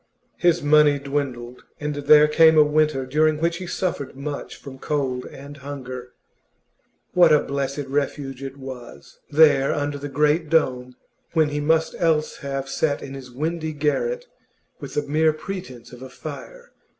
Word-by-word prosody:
His 175 -2 +2
money 150 -1 +5
dwindled, 135 -4 -4 0.2
and 150 0 -3
there 150 +1 +6
came 160 +1 +5
a 155 - +8
winter 150 -2 +1
during 155 +3 +2
which 170 +2 0
he 185 -1 -7
suffered 170 -8 -3
much 140 +1 -6
from 135 -2 -11
cold 130 -4 -2
and 140 +1 -11
hunger. 130 -3 -8 1.0
What 175 -3 +6
a 150 - +5
blessed 140 0 -3
refuge 140 -1 -3
it 135 0 -7
was, 130 -3 -10
there 145 -3 +5
under 145 0 -2
the 145 +1 -6
great 150 +3 +1
dome, 125 -6 +1 0.4
when 160 -2 +3
he 145 0 -2
must 160 +2 +1
else 155 -2 +1
have 135 -1 -4
sat 145 +1 -1
in 135 - -8
his 135 -2 -9
windy 160 +4 -3
garret 475 - -1 0.5
with - - -8
the 150 - +1
mere 155 +2 +2
pretence 155 -8 -8
of 125 0 -12
a 130 - -8
fire! 485 - -10
145 Hz, 160 wpm, -23 LUFS, 135-155 Hz, 1.0 s, a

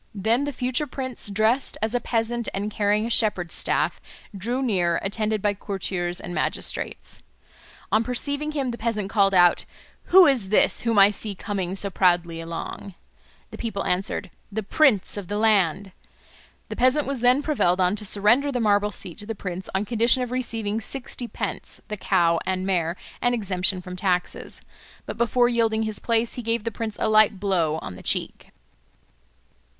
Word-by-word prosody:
Then 225 +7 +1
the 290 - -2
future 255 +3 -1
prince, 260 -6 -5
dressed 220 +6 +1
as 220 +1 -1
a 245 - +2
peasant 235 0 -1
and 205 +2 -3
carrying 210 +1 +1
a - - -3
shepherd's 190 -7 +2
staff, - - 0 0.3
drew 240 +7 -2
near, 175 -8 +1
attended 215 +1 -1
by 205 -1 +2
courtiers 190 -3 -3
and 175 - -7
magistrates. - - -3 0.7
On 215 +1 +3
perceiving 285 +5 -1
him 275 -4 -1
the 235 - -7
peasant 215 -4 -2
called 195 -3 +3
out, 175 -1 +5 0.4
"Who 370 0 +7
is 255 - +2
this 210 - +4
whom 230 -2 0
I 200 +1 +7
see 210 0 -4
coming 190 -2 -3
so 200 0 -3
proudly 175 -3 +1
along?" 165 +3 -7 0.6
The - - -9
people 220 -4 -3
answered, 190 0 -2 0.2
"The 220 +2 -3
prince 215 - +2
of 200 -3 -6
the 205 - -3
land." 200 -3 +2 0.8
The - - -5
peasant 260 +4 +3
was 275 -1 -3
then 250 +4 +3
prevailed 190 - +1
on 180 +2 +2
to 210 - -5
surrender 215 +8 +3
the 250 - -2
marble 205 -2 +2
seat 180 -4 -7
to 205 - -7
the 225 - -4
prince 185 -1 -6
on 195 +2 0
condition 235 +3 +3
of 245 - -5
receiving 225 -4 -2
sixty 245 +1 -4
pence, - - -5
the 210 - -3
cow 170 -4 +2
and 185 0 -2
mare, 175 -3 0 0.3
and 245 0 +2
exemption 185 -3 0
from 180 0 -7
taxes. 180 -1 -2 0.4
But - - -7
before 240 +1 +3
yielding 225 -2 +1
his 215 -2 -2
place 230 0 0
he 245 - -5
gave 230 -1 -1
the 230 - -3
prince 220 -1 -5
a - - +1
light 215 -2 +4
blow 175 -6 0
on 90 - -7
the - - -11
cheek. - - -3
210 Hz, 175 wpm, -24 LUFS, 190-235 Hz, 0.8 s, Who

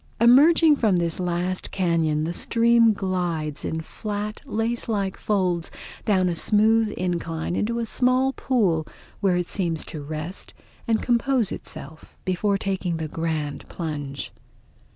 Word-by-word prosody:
Emerging 295 +7 +6
from 220 -8 +2
this 170 -1 0
last 180 +1 -2
cañon 165 -4 +1
the 170 - -2
stream 230 +3 +4
glides, 175 -7 -2
in 160 - -2
flat 210 +5 -5
lace 230 0 -1
like 200 -3 -1
folds, 180 -5 0 0.4
down 190 -3 +3
a 175 - 0
smooth 215 +5 +3
incline 170 -2 -2
into 230 +4 -1
a 235 - -1
small 255 +3 +2
pool 190 -14 +1 0.3
where 190 -3 +2
it 175 -1 -1
seems 170 -5 -1
to 155 - -7
rest 155 +5 -5 0.3
and 225 -1 +1
compose 245 -2 +2
itself 160 0 -7
before 195 +2 +1
taking 190 -3 -2
the 160 -1 -3
grand 155 -2 -3
plunge. 145 -4 -5
185 Hz, 135 wpm, -24 LUFS, 165-225 Hz, 0.4 s, Emerging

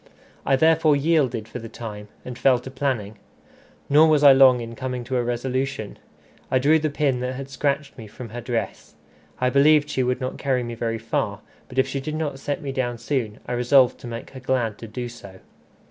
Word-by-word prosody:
I 135 - +4
therefore 160 +1 +4
yielded 140 -7 +1
for 125 - -7
the 115 -1 -9
time, 105 -3 -8 0.2
and 125 - -6
fell 125 +1 +3
to 130 +2 -9
planning. 120 -7 -3 0.7
Nor 150 +3 +6
was 150 -2 +3
I 140 -2 +9
long 130 -2 +6
in 115 0 -6
coming 125 0 -4
to 130 +2 -2
a 120 - +1
resolution. 125 -1 -3 0.5
I 130 - +2
drew 150 +5 +4
the 155 0 -1
pin 140 -3 0
that 125 +1 -3
had 135 +1 -7
scratched 140 +1 -1
me 110 - -9
from 115 +3 -10
her 120 +3 -6
dress. 115 -4 -4 0.4
I 125 0 +1
believed 150 +2 +4
she 130 - 0
would 125 0 0
not 130 -1 -4
carry 130 -3 0
me 120 0 -5
very 115 0 -2
far; 115 0 -2 0.3
but 125 - -11
if 130 0 +3
she 135 +1 -3
did 155 +3 -4
not 150 -4 -3
set 145 +4 -3
me 140 - -3
down 120 -2 -2
soon, 115 -3 -3
I - - -6
resolved 125 +1 +3
to - - -9
make 115 0 -7
her 130 - -9
glad 125 -4 -1
to 115 - -8
do 120 +3 -5
so. 100 -5 -12
130 Hz, 215 wpm, -23 LUFS, 120-140 Hz, 0.7 s, I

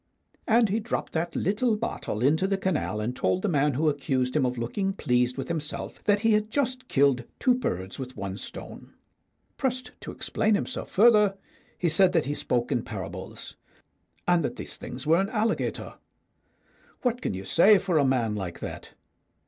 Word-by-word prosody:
And 230 -1 +4
he 210 +4 +1
dropped 225 +1 -3
that 170 +1 -2
little 215 +4 +1
bottle 165 - -3
into 160 +8 +3
the 195 0 +1
canal, 185 - -1
and 115 +4 -2
told 95 -5 0
the - - +2
man 145 -4 +2
who 155 +4 +1
accused 135 -3 0
him 140 -4 +3
of 125 0 -3
looking 190 - -1
pleased 125 -7 +1
with 135 - -4
himself 155 -3 -5
that 205 -1 +3
he 225 0 +3
had 210 0 +1
just 255 0 -1
killed 135 -3 +3
two 255 - +3
birds 95 - -3
with 130 0 -7
one 95 0 -4
stone. - - -9 0.6
Pressed 255 -2 -2
to - - -8
explain 215 -1 0
himself 230 - -3
further, 210 -2 +5 0.4
he 175 - 0
said 180 +3 +4
that 165 -4 +2
he 145 - -1
spoke 120 -4 -1
in - - +1
parables, - - -7 0.7
and 175 -2 +4
that - - -2
these - - -6
things 125 +2 -7
were 165 +3 +4
an 195 - -2
alligator. 220 0 -1 1.1
What 245 -1 0
can - - -2
you 95 +1 -6
say 200 - +6
for 185 -4 +1
a - - +4
man 125 -5 +1
like 95 -5 -5
that? - - -7
165 Hz, 180 wpm, -27 LUFS, 125-210 Hz, 1.1 s, say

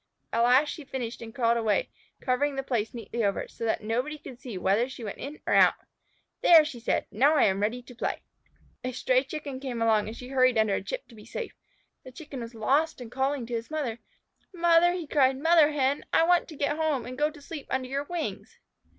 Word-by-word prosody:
At 230 - +2
last 255 +5 +5
she 310 - -6
finished 255 -4 -5
and 225 -1 -8
crawled 235 -3 +2
away, 230 - 0 0.3
covering 275 +2 0
the 270 - -2
place 230 -5 -1
neatly 230 0 -4
over, 200 -1 0
so 230 - -6
that 220 - 0
nobody 250 +8 -2
could 255 -4 -11
see 235 -7 -6
where 200 +7 +1
she 260 -2 -9
went 205 - -6
in 290 +3 -7
or - - 0
out. - - +6 0.7
"There!" 325 -3 +8
she 265 -5 -6
said. 235 - 0
"Now 275 +9 +4
I - - +5
am 195 -1 +2
ready 225 +4 -1
to 250 - -13
play." 240 - -3 0.6
A 255 0 -3
stray 255 +1 +2
Chicken 280 -1 -6
came 260 -3 -4
along 220 -2 +2
and 220 - -7
she 250 - -9
hurried 255 -2 +3
under 220 -2 +3
a - - 0
chip - - -6
to - - -16
be 215 -2 -13
safe. 480 - -6 0.5
The 255 - -11
Chicken 285 0 -9
was 230 0 -8
lost 280 +9 +1
and 240 -2 -9
calling 265 0 -1
to 240 - -7
his 230 0 -3
mother. 280 -7 -3 0.5
"Mother!" 345 -1 +4
he 355 -2 -4
cried. 270 -3 +3
"Mother 320 +1 +5
Hen, 280 -1 0
I - - +4
want 350 +1 +3
to 320 - -10
get 290 +1 -1
home 310 -6 0
and 255 - -7
go 295 +3 +1
to 305 -1 -14
sleep 290 0 -8
under 260 -1 -1
your 275 +2 -3
wings." 345 0 -5
260 Hz, 230 wpm, -27 LUFS, 235-295 Hz, 0.7 s, There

